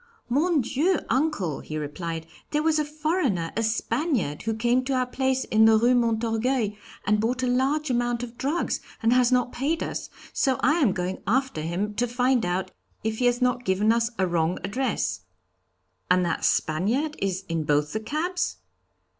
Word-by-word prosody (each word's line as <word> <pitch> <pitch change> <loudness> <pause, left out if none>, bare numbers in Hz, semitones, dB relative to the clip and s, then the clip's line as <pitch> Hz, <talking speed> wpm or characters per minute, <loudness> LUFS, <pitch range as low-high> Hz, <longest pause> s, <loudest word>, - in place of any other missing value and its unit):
'Mon 305 +4 +2
Dieu, 305 +10 +1
uncle,' 245 - 0
he 155 - -6
replied, 160 +2 -4 0.2
'there 300 0 0
was 315 -1 +3
a - - +2
foreigner, 295 - -1
a 225 - 0
Spaniard, 225 - -1
who 225 0 -2
came 240 +3 +2
to 270 +1 -2
our 255 0 +2
place 265 +1 0
in 220 0 +4
the 220 0 +6
Rue 240 +3 +4
Montorgueil 230 0 +1 0.3
and 210 +1 +3
bought 245 +4 0
a - - +1
large 270 +4 +1
amount 240 0 0
of 240 -1 -7
drugs, 290 +8 -1 0.2
and 225 +1 +4
has 250 0 +4
not 250 -1 +2
paid 300 +6 -1
us, - - -5 0.2
so 265 -2 +2
I 305 +6 +3
am 260 - +4
going 185 0 -3
after 260 - +1
him 180 +6 -2
to 245 - +1
find 245 -3 +1
out 180 +2 -2 0.3
if 220 0 -2
he 250 - +1
has 245 +1 +2
not 250 0 +1
given 205 +1 +2
us 230 0 +2
a 190 - +2
wrong 170 -1 0
address.' 255 +7 -1 0.9
'And 180 0 +4
that 170 - -1
Spaniard 230 - +1
is 195 -1 -1
in 165 -1 -1
both 150 0 +1
the 220 - -1
cabs?' 315 +11 -2
240 Hz, 180 wpm, -25 LUFS, 195-265 Hz, 0.9 s, the